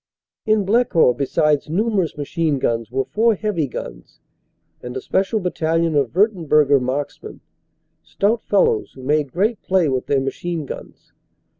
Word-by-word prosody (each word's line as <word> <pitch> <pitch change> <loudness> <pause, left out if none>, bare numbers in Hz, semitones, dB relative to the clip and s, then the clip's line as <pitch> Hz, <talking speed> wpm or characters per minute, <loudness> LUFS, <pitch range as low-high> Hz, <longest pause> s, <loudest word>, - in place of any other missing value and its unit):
In 215 -2 +2
Blecourt 195 - +3
besides 150 +2 +1
numerous 195 -1 0
machine 150 0 -1
guns 115 -3 -1
were 130 +2 -1
four 225 - +2
o - - -4
heavy 195 -7 -1
guns - - -9 0.6
and 125 +1 -6
a - - -2
special 195 - 0
battalion 165 -3 0
of 140 -4 +1
Wurternburger 155 - +3
marks 135 +3 -3
men, - - -10 0.6
stout 220 +4 0
fellows 460 -4 +1
who 130 - -12
made 145 0 0
great 210 +6 0
play 185 -5 +1
with 130 -1 -2
their 140 - +2
machine 155 +4 -4
guns. - - -10
160 Hz, 150 wpm, -20 LUFS, 140-200 Hz, 0.6 s, Blecourt